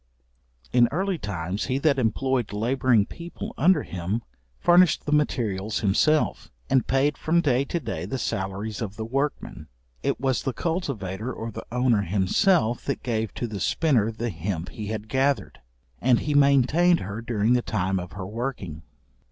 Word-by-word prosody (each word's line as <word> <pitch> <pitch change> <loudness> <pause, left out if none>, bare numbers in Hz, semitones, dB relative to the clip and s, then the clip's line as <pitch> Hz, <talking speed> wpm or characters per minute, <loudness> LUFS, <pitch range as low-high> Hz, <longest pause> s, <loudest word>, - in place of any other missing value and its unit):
In 120 -1 +6
early 190 +2 -1
times, 95 -2 -3
he 130 0 0
that 140 -1 +2
employed 125 0 0
labouring 120 0 +2
people 170 +7 -8
under 165 0 +3
him, 95 +6 -3 0.4
furnished 175 -1 +4
the 150 - -2
materials 110 -9 0
himself, 130 +10 +2 0.2
and 130 - +3
paid 135 +3 +1
from 165 +2 +2
day 135 -4 +2
to 170 - -2
day 110 - -4
the 135 - -3
salaries 105 0 -3
of 105 -3 -4
the 110 - -4
workmen. 135 - -3 0.3
It - - -1
was 130 -1 0
the 135 - -2
cultivator 125 - -3
or 115 -2 -5
the - - -8
owner 125 -3 +2
himself 110 - +2
that - - -3
gave 110 -4 -1
to - - -2
the 105 -4 -5
spinner 120 - +2
the 115 +1 -3
hemp 85 0 -4
he 105 -2 -7
had 110 0 -4
gathered, 130 - 0 0.4
and 125 -1 +3
he 150 - -1
maintained 145 +5 +4
her 100 +4 -5
during 115 0 +1
the 125 - +3
time 95 -4 -1
of 90 -1 -8
her 95 -2 -6
working. 105 - -5
120 Hz, 165 wpm, -25 LUFS, 100-140 Hz, 0.4 s, In